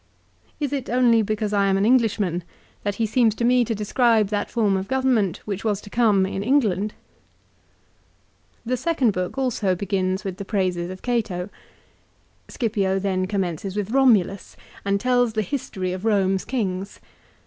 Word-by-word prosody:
Is 290 -2 -2
it 270 -3 -3
only 240 -2 +4
because 215 0 -2
I 200 -1 +3
am 195 0 +2
an 195 - +2
Englishman 210 -7 +2 0.4
that 205 -1 -2
he 225 - 0
seems 220 0 +2
to 235 - -1
me 250 0 +4
to 225 -1 -2
describe 215 0 +2
that 205 -1 -2
form 215 -5 +1
of 190 +1 -2
government 255 -8 +1
which 200 -2 -4
was 210 -3 0
to 205 - -13
come 215 -5 +3
in 195 0 -3
England? 215 -5 +1 1.7
The 250 +2 0
second 265 -4 +1
book 185 +6 -3
also 230 -8 0
begins 190 0 -1
with 190 -3 -5
the 200 - -5
praises 185 -4 -1
of 185 0 -9
Cato. 210 -6 -2 1.0
Scipio 200 -5 -1
then 185 -1 -1
commences 190 -1 -3
with 205 0 -2
Romulus, 225 -8 +2 0.3
and 200 0 +1
tells 245 -1 +2
the 215 -1 0
history 190 -7 -3
of 185 - -5
Home's 195 -3 +1
kings. 195 -6 -3
205 Hz, 160 wpm, -23 LUFS, 190-235 Hz, 1.7 s, only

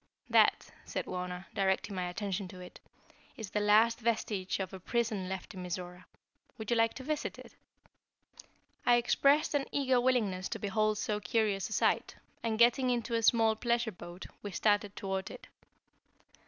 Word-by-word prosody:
"That," - - +3
said - - -4
Wauna, 180 0 -5
directing 195 +1 0
my 180 -1 -2
attention 195 +1 -3
to 185 0 -11
it, 180 0 -11 0.6
"is 220 -4 -7
the 210 - 0
last 215 +3 +4
vestige 215 -5 -1
of 190 0 -4
a 190 - -7
prison 215 -2 -1
left 190 +2 -5
in 185 - -7
Mizora. 180 0 -6 0.5
Would 220 +1 -5
you - - +4
like 225 0 +2
to 260 - -7
visit 305 +2 -3
it?" - - -13 1.3
I 240 - +5
expressed 280 +6 +3
an 285 -2 0
eager 260 -3 +2
willingness 215 -8 +1
to - - -4
behold 215 +1 +1
so 210 0 -1
curious 205 0 0
a - - -4
sight, - - +1 0.3
and 225 -2 -1
getting 245 +3 +4
into 240 -1 -1
a 230 - +2
small 225 -1 +4
pleasure 235 0 0
boat, 175 0 -10 0.2
we 205 - -5
started 205 +1 +1
toward 190 -1 -3
it. - - -10
210 Hz, 170 wpm, -32 LUFS, 190-235 Hz, 1.3 s, I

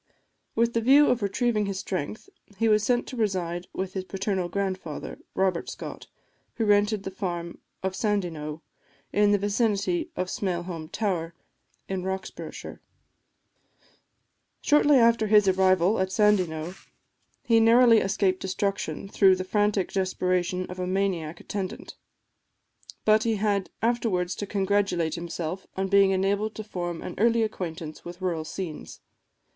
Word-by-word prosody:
With 235 +1 +2
the 230 - +1
view 275 +5 +6
of 250 -1 0
retrieving 210 +1 0
his 195 -1 -3
strength, 185 - -4 0.3
he 225 - +2
was 215 -1 +4
sent 240 +2 +1
to - - -8
reside 180 -6 -1
with 190 0 -4
his 190 - -3
paternal 190 -1 -2
grandfather, 185 -5 -4 0.2
Robert 185 -3 0
Scott, - - -8 0.5
who 225 - 0
rented 205 0 +3
the 195 - -5
farm 175 -3 -4 0.2
of 190 0 -1
Sandyknowe, 170 -8 -2 0.5
in 205 0 +4
the 205 - +4
vicinity 200 -3 0
of 185 - -1
Smailholm 175 -4 -4
Tower, 170 -6 -2 0.5
in 190 -1 -2
Roxburghshire. 190 +1 -6 1.8
Shortly 295 -1 +5
after 230 -2 +4
his 210 -1 +5
arrival 190 +1 +3
at 190 0 0
Sandyknowe, 185 -6 +2 0.7
he 230 -1 +4
narrowly 230 0 +6
escaped 190 -1 +1
destruction 195 +1 -2
through 195 -1 +5
the 185 - -3
frantic 205 0 +1
desperation 185 -1 0
of 180 0 -9
a 180 - -2
maniac 180 -4 -1
attendant; 195 -3 -5 1.1
but 215 0 +5
he 225 0 +1
had 200 -2 0
afterwards 220 -6 +1
to 205 - -4
congratulate 195 -5 0
himself 170 +1 -5
on 190 0 -1
being 200 0 +5
enabled 200 +3 0
to 215 - -5
form 175 -5 -5
an - - -5
early 230 +1 +4
acquaintance 165 -7 -5
with 175 +1 -9
rural 175 -4 -1
scenes. 160 -1 -7
195 Hz, 140 wpm, -26 LUFS, 180-210 Hz, 1.8 s, view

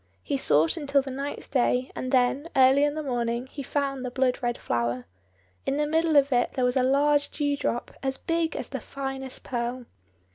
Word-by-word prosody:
He 115 - -1
sought 150 +3 +3
until 280 -2 +2
the 270 - -6
ninth 275 +2 -5
day, 250 0 +1
and 255 - -4
then, 260 +3 +2
early 265 +2 +6
in 295 0 -1
the 310 - -3
morning, 240 -2 -1
he 280 +2 -8
found 275 -1 -2
the 250 - -2
blood 255 0 +1
red 240 -1 -1
flower. 120 +1 -2 0.6
In 275 - -1
the 300 - +2
middle 320 +1 +1
of 280 0 +5
it 245 - +1
there 255 -2 +1
was 250 - +1
a 260 - +3
large 285 +3 +3
dew 290 -1 -1
drop, 240 -3 -2
as 265 -1 -1
big 330 -1 -1
as - - -4
the - - -4
finest 270 -1 -5
pearl. 245 0 -3
265 Hz, 205 wpm, -26 LUFS, 245-285 Hz, 0.6 s, early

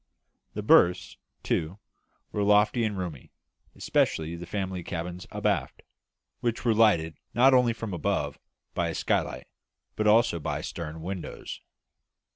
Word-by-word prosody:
The - - -3
berths, 90 +1 +4 0.3
too, 80 +5 -1 0.5
were 105 - -2
lofty 105 +3 +4
and 105 -2 -2
roomy, 85 -7 -6 0.4
especially 80 +1 0
the 85 0 -8
family 95 -1 -3
cabins 90 +1 -5
abaft, - - -1 0.6
which 120 +1 -2
were 115 - +4
lighted 85 -8 +3 0.2
not 130 +3 +6
only 125 -2 +5
from 115 -3 -6
above 85 - -1 0.3
by - - 0
a - - -4
skylight, 65 - -1 0.5
but 110 - 0
also 105 -5 +4
by - - -3
stern 80 -1 -6
windows. 95 0 -6
95 Hz, 130 wpm, -27 LUFS, 85-110 Hz, 0.6 s, not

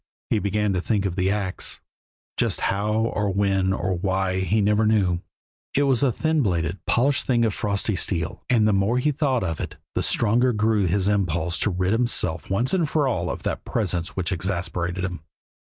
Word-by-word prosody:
He 110 - +3
began 105 0 0
to 90 - 0
think 100 0 0
of 90 -3 -2
the 95 0 +1
ax 100 -2 -2 0.6
just - - 0
how 100 +2 0
or 110 -2 0
when 95 -1 +1
or 95 -1 -1
why 95 +1 0
he 95 +4 +1
never 105 +1 +3
knew. 95 -5 +2 0.6
It 145 - +3
was 135 -4 +2
a 135 -3 +3
thin 160 +5 +1
bladed, 85 -4 -1
polished 135 +3 +2
thing 120 -3 +3
of 110 - 0
frosty 100 +1 -1
steel, 85 -3 -2
and 115 -4 +4
the 105 - +3
more 100 +5 +2
he 150 +4 +2
thought 135 -5 0
of 80 -3 -3
it - - -5 0.2
the - - 0
stronger 120 +3 +2
grew 105 -2 +2
his 95 +2 +1
impulse 90 -4 0
to - - +1
rid 95 +1 0
himself 115 -8 0
once 115 - 0
for 145 -1 +1
all 90 -9 -1
of - - -5
that - - -3
presence 90 -4 -2
which 95 0 -1
exasperated 90 0 -2
him. 90 -4 -5
100 Hz, 190 wpm, -24 LUFS, 95-115 Hz, 0.6 s, and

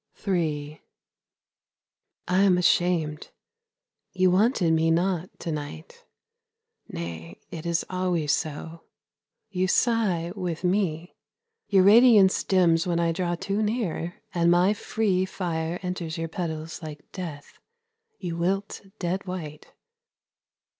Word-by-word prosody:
III 155 -5 -1 1.5
I 180 +1 +2
am 190 -3 +5
ashamed, 170 -4 +1 0.8
you 185 -1 +3
wanted 190 -3 +3
me 160 0 +2
not 175 +1 +1
to 165 - -3
night 145 - -7 0.8
Nay, 85 0 -7
it 165 0 -6
is 170 -1 0
always 180 -5 0
so, 160 +2 -3 0.7
you 185 -1 0
sigh 195 -6 +1
with 180 -3 -4
me. 180 -3 0 0.5
Your 195 -2 +4
radiance 210 -2 +6
dims 175 -3 +3
when 170 -1 +1
I 170 -1 +2
draw 175 0 -1
too 200 +4 -2
near, 210 -6 -2 0.2
and 170 -1 +2
my 180 +4 +4
free 205 -3 0
Fire 170 -3 -3
enters 180 -2 -4
your 165 0 -3
petals 160 -1 -5
like 150 -2 -9
death, 160 -6 -8 0.6
you 175 -3 -4
wilt 195 +4 -1 0.2
dead 190 +1 -3
white. 155 -5 -7
175 Hz, 115 wpm, -26 LUFS, 160-185 Hz, 1.5 s, radiance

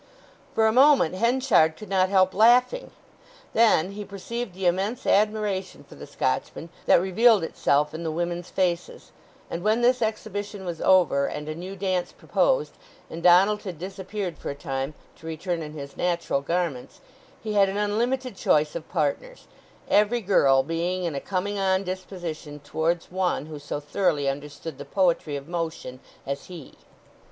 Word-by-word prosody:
For 220 - +3
a 220 - +4
moment 265 - +5
Henchard 230 -7 +3
could 215 - -10
not 190 -1 +2
help 190 -1 +3
laughing. 245 - +4 0.6
Then 215 -6 +4
he 205 +1 -6
perceived 205 +1 -6
the 190 0 -4
immense 195 +7 0
admiration 210 -2 0
for - - -16
the - - -11
Scotchman 65 - -2 0.2
that - - +6
revealed 205 +2 +4
itself 150 -2 +1
in 160 - -5
the 165 - -2
women's 175 +2 -3
faces; 175 -2 -2 0.4
and 170 - -5
when 215 +4 +2
this 250 +1 +3
exhibition 205 -2 -3
was 170 -2 -5
over, 170 -7 +4
and 150 0 -6
a 155 - -3
new 180 +4 -7
dance 185 -2 -2
proposed, - - +1 0.4
and 165 - -6
Donald 190 +4 +5
had 185 -5 -7
disappeared 190 +1 -5
for - - -5
a 140 - -4
time 135 -1 -4 0.2
to 160 - -11
return 165 +2 -3
in 150 -1 -7
his 140 -2 -8
natural 170 -5 -1
garments, 165 -4 -3 0.4
he 215 -1 -3
had 200 -1 +4
an 195 - -3
unlimited 235 +4 -1
choice 150 -4 +2
of 165 -2 -7
partners, 175 - -2 0.4
every 210 +4 +3
girl 135 -9 +4
being 170 +4 -2
in 170 -3 -2
a 140 - -4
coming 200 +1 -2
on 190 0 +1
disposition 175 -5 -6
towards 160 +4 -2
one 185 -5 -1
who 155 -1 -8
so 145 0 -5
thoroughly 150 -1 0
understood 145 +1 -5
the - - -5
poetry 165 -2 0
of 140 +1 -7
motion 165 -7 -4 0.3
as 140 +1 -4
he. 170 -6 -11
180 Hz, 165 wpm, -25 LUFS, 160-205 Hz, 0.6 s, that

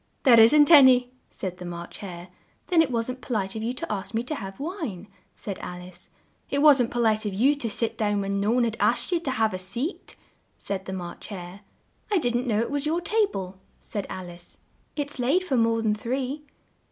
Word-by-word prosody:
"There 240 -4 +7
isn't 295 +8 +7
an 285 -5 +10
y," 250 -1 +4 0.2
said 185 -2 -5
the 180 - -8
March 170 0 -8
Hare. 180 -2 -8 0.4
"Then 345 -3 +4
it 315 - +1
wasn't 250 +1 -2
po 250 - -4
lite 195 -1 -2
of 220 - -4
you 230 +2 -1
to 335 - -5
ask 205 +1 -4
me 230 - 0
to 280 - -4
have 195 -8 -7
wine," 285 - -5 0.3
said 200 -3 -6
Al 180 0 -7
ice. 180 0 -13 0.4
"It 280 +1 0
wasn't 270 -6 +6
po 240 - -4
lite 215 -2 +2
of 195 - -4
you 260 +8 +4
to 280 -6 -3
sit 225 +1 -1
down 205 -2 +1
when 200 0 -1
no 205 - +1
one 245 +2 +3
had 225 -2 -1
asked - - +1
you 350 - +2
to 330 - -4
have 220 -4 +1
a 185 - -4
seat," 235 - -4 0.4
said 195 -1 -5
the 190 - -5
March 175 -2 -7
Hare. 185 -1 -8 0.5
"I 415 - +2
didn't 245 -4 0
know 215 -3 +1
it 235 - -3
was 285 +1 -1
your 325 +3 +1
ta 430 +4 +1
ble," 190 0 -6 0.2
said 205 -2 -5
Al 180 -2 -7
ice; 175 0 -14 0.4
"it's 290 -2 -4
laid 280 +10 +2
for 290 -8 -1
more 230 -1 +2
than 215 -1 +2
three." 260 +6 -3
230 Hz, 225 wpm, -25 LUFS, 195-275 Hz, 0.5 s, an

